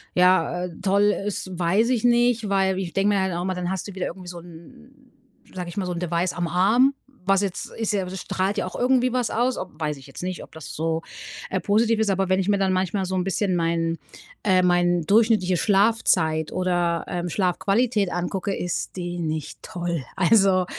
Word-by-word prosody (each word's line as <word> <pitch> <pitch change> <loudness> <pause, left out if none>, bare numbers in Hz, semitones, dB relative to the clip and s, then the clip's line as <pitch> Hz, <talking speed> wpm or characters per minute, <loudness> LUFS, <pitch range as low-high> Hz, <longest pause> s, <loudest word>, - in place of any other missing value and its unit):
ja, 180 -1 +3
äh, - - -5
toll 200 +2 +3
ist, 200 -2 -3
weiß 190 +7 +2
ich 240 -4 +1
nicht. 240 -2 +3
Weil 190 -1 +1
ich 175 -4 -4
denke 195 +3 +2
mir 195 - +2
halt 190 -1 -1
auch 170 - -2
immer, 185 +1 -2
dann 180 -1 -3
hast 190 0 -3
du 200 - -9
wieder 185 - -2
irgendwie 185 -2 -9
so 175 -1 -7
'n 170 - -14 1.0
'n, - - -21
sage 180 -2 -5
ich 175 - -9
mal, 195 - -1
so 180 - -3
'n 170 - -4
Device 175 +1 -1
am 175 -1 -2
Arm, 220 - +3 0.3
was 195 0 +3
jetzt 195 -3 -4
ist 225 -2 -1
ja 195 -2 0
das 185 +1 -6
strahlt 190 +2 -1
ja - - 0
auch - - -7
irgendwie 250 0 +3
was 250 -3 0
aus, 245 +2 0
ob 180 -4 -7
weiß 150 -1 -1
ich 135 - -14
jetzt 135 - -9
nicht, 185 0 -4
ob - - -15
das 160 -1 -9
so, 160 +1 -1 0.5
äh, 190 - -1
positiv 220 +5 +2
ist. 220 -2 +1
Aber 195 -1 0
wenn 185 0 +3
ich 190 - -1
mir 205 - +3
dann 195 -1 +1
manchmal 185 +1 0
so 190 +1 -3
'n 185 - +1
bisschen 195 0 0
mein 165 -1 0 0.5
äh, 185 -2 +4
mein 175 -1 +3
durchschnittliche 205 -1 +3
Schlafzeit 195 -7 +2
oder, 175 -2 0
ähm, 175 0 -2
Schlafqualität 200 +4 +1
angucke, 185 +3 -2
ist 180 +1 -3
die 175 -1 -4
nicht 155 -2 -4
toll. 175 -5 -4
Also, 190 -1 +4
185 Hz, 215 wpm, -24 LUFS, 175-205 Hz, 1.0 s, äh